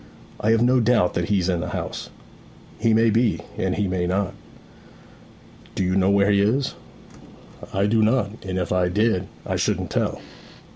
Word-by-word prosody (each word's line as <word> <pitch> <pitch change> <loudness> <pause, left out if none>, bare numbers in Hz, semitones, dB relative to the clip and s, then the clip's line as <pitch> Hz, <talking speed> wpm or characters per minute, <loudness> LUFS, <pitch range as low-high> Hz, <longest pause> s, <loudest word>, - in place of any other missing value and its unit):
'I 110 - 0
have 115 0 +4
no 125 +1 +4
doubt 115 -6 +2
that 85 +2 -2
he's 95 -4 +1
in 90 -2 0
the - - -4
house.' - - -5 0.7
'He 115 +1 +2
may 115 +1 +4
be; 115 0 +1
and - - -1
he 105 -1 0
may 90 -1 -1
not.' 95 +1 -1 1.4
'Do - - 0
you 90 0 0
know 95 0 +3
where 100 +1 +3
he 100 -1 +3
is?' 130 +7 +1 1.0
'I 95 +1 +1
do 110 +2 +2
not; 110 -2 +2
and 95 -1 -4
if 90 - -2
I 90 -1 +2
did 105 -1 +1 0.2
I - - -2
shouldn't - - -1
tell.' - - -1
100 Hz, 180 wpm, -23 LUFS, 95-115 Hz, 1.4 s, have